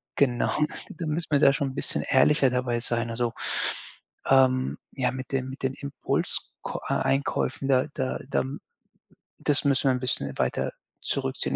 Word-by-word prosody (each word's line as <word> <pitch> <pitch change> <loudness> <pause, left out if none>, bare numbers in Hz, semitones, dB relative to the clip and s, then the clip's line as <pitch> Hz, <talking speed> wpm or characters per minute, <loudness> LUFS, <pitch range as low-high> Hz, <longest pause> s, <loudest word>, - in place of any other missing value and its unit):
genau, 125 -4 +2 0.4
da 165 - -6
müssen 160 +3 -2
wir 145 - +4
da 140 - +7
schon 140 0 -1
'n - - -12
bisschen - - -1
ehrlicher 135 0 +4
dabei 125 -1 0
sein 120 -1 -2
also, 120 0 -1 1.0
ähm, 130 -1 +4 0.2
ja, 125 -2 0
mit 130 0 -7
den 130 -1 -1
mit 135 - -9
den 130 0 0
Impuls 140 0 0
k - - -4
äh, - - +2
Einkäufen, 135 0 0
da 130 +1 +3
da 130 -2 -2
da - - +1 1.0
das 145 0 +2
müssen 140 -1 +3
wir - - +4
'n 125 - -1
bisschen 130 - +1
weiter - - 0 0.3
zurückziehen - - -1
130 Hz, 165 wpm, -26 LUFS, 125-140 Hz, 1.0 s, da